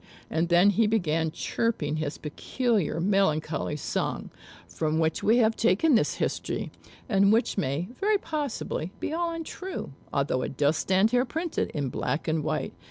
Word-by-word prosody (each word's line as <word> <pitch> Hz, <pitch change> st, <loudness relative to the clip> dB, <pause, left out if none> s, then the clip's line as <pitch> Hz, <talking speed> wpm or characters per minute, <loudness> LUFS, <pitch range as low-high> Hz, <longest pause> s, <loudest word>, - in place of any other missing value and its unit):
And 165 Hz, +1 st, 0 dB
then 175 Hz, +4 st, +6 dB
he 220 Hz, +2 st, +3 dB
began 165 Hz, -7 st, +1 dB
chirping 155 Hz, -3 st, -1 dB
his 155 Hz, -1 st, -3 dB
peculiar 200 Hz, -, -1 dB
melancholy 165 Hz, -6 st, +1 dB
song, 150 Hz, -, -3 dB, 0.4 s
from 155 Hz, -1 st, -1 dB
which 160 Hz, 0 st, +1 dB
we 225 Hz, +3 st, +4 dB
have 225 Hz, -2 st, +3 dB
taken 230 Hz, -, +3 dB
this 225 Hz, -, +3 dB
history; -, -, -2 dB, 0.4 s
and 200 Hz, -3 st, +4 dB
which 225 Hz, +3 st, +2 dB
may, 160 Hz, -1 st, -1 dB
very 420 Hz, +1 st, +3 dB
possibly, 295 Hz, -, -3 dB
be -, -, -3 dB
all 340 Hz, +1 st, 0 dB
untrue, 330 Hz, -, -6 dB, 0.2 s
although 140 Hz, -2 st, 0 dB
it 130 Hz, -, -5 dB
does 145 Hz, +2 st, +3 dB
stand 190 Hz, +6 st, +2 dB
here 245 Hz, 0 st, +3 dB
printed 325 Hz, +6 st, -2 dB
in 140 Hz, -3 st, -1 dB
black 145 Hz, +6 st, -2 dB
and 155 Hz, -1 st, 0 dB
white. -, -, -2 dB
190 Hz, 160 wpm, -27 LUFS, 155-235 Hz, 0.4 s, then